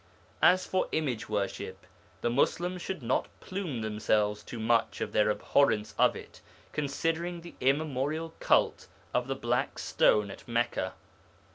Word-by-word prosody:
As 185 +1 +5
for 185 - 0
image 130 -10 -1
worship, 105 -2 -3 0.4
the 120 - +1
Muslims 175 +8 +1
should 185 -7 -4
not 120 +3 +1
plume 180 - -4
themselves 105 -1 +1
too 120 - -8
much 115 +1 +1
on - - -3
their 105 0 +3
abhorrence 105 0 +2
of - - +4
it, - - -11 0.3
considering 165 +4 -1
the 170 - -11
immemorial 150 +3 0
cult - - +2 0.3
of 125 0 +1
the 135 - -1
Black 120 -1 -1
Stone 105 -2 +3
at - - -12
Mecca. 120 0 0
130 Hz, 140 wpm, -30 LUFS, 110-165 Hz, 0.4 s, As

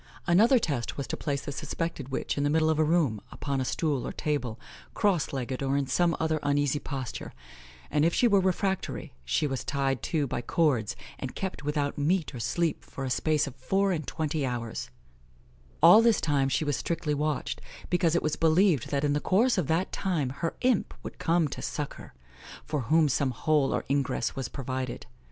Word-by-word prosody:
Another 215 +9 +5
test 140 - -2
was 140 - -2
to - - -3
place 140 -2 -2
the - - -4
suspected 155 -1 -4
witch 130 - -2
in 145 - 0
the 145 - +2
middle 160 +1 +3
of 155 - 0
a - - +5
room, 150 -9 +2
upon 140 -2 -2
a - - +1
stool 145 0 -1
or - - -3
table, 130 -7 -2 0.4
cross 195 -8 +1
legged, 130 -1 -3
or 135 0 +1
in 140 - +1
some 170 +6 +1
other 160 -1 +1
uneasy 145 0 +1
posture, 135 -6 -5 0.6
and 150 - +2
if 165 - +4
she 240 - +3
were 200 -3 +5
refractory, 190 +1 -1
she 65 - 0
was 135 -3 -2
tied 135 -3 -1
too 155 -4 0
by 120 - -3
cords, 120 -5 +1 0.2
and 130 - -5
kept 190 -5 -4
without 145 0 -1
meat 160 +2 +1
or 125 - -6
sleep 170 +7 -1
for 135 - -7
a 130 - -2
space 150 +2 +2
of 135 -3 -8
four 195 +10 +1
and 155 -6 -2
twenty 155 -1 -2
hours; 120 -3 -3 0.9
all 175 +7 +9
this 230 -2 +4
time 140 -3 +1
she 155 - 0
was 145 -1 +1
strictly 165 -3 -2
watched, 150 +1 -2 0.3
because 175 -2 +2
it - - +1
was 155 - 0
believed 165 - +3
that 140 0 0
in 145 -1 +2
the 145 - +1
course 225 +11 +3
of 180 -7 0
that 170 +4 0
time 170 -9 -1
her 165 +5 -3
imp 250 -5 +1
would - - -8
come 165 -1 +2
to - - -6
suck 150 -2 -4
her, - - -12 0.5
for 150 - -2
whom 160 -1 +5
some 140 0 +1
hole 140 +2 +1
or - - -1
ingress 140 0 0
was 135 -2 -3
provided. 130 -2 -4
150 Hz, 200 wpm, -28 LUFS, 135-170 Hz, 0.9 s, all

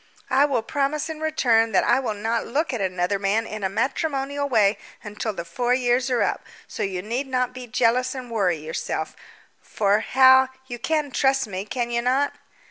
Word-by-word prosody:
"I 280 +2 +5
will 255 -6 0
promise 285 +4 -1
in 310 - -8
return 235 -8 +2
that - - +4
I - - +3
will 240 -5 -3
not 225 +3 -2
look 295 +4 -1
at 235 - -2
another 185 +1 -1
man 205 +3 +1
in 215 -2 -7
a 190 - +1
matrimonial 280 - -1
way 215 -4 +3 0.2
until 210 +1 -4
the 170 -4 -6
four 245 +5 0
years 250 +1 +1
are 245 -2 +2
up, - - -2 0.2
so - - -7
you 185 -2 -2
need 245 +6 -3
not 250 -1 -1
be 250 -1 -8
jealous 250 +2 +1
and 250 -2 -7
worry 190 -7 +1
yourself; 155 +1 -4 0.5
for, 205 0 +1
Hal, 260 +2 +5 0.2
you 240 -2 -7
can 305 +1 -1
trust 270 0 +2
me, 195 -2 -5
can 240 +2 -3
you 235 0 0
not?" 265 +4 +1
245 Hz, 195 wpm, -23 LUFS, 210-270 Hz, 0.5 s, I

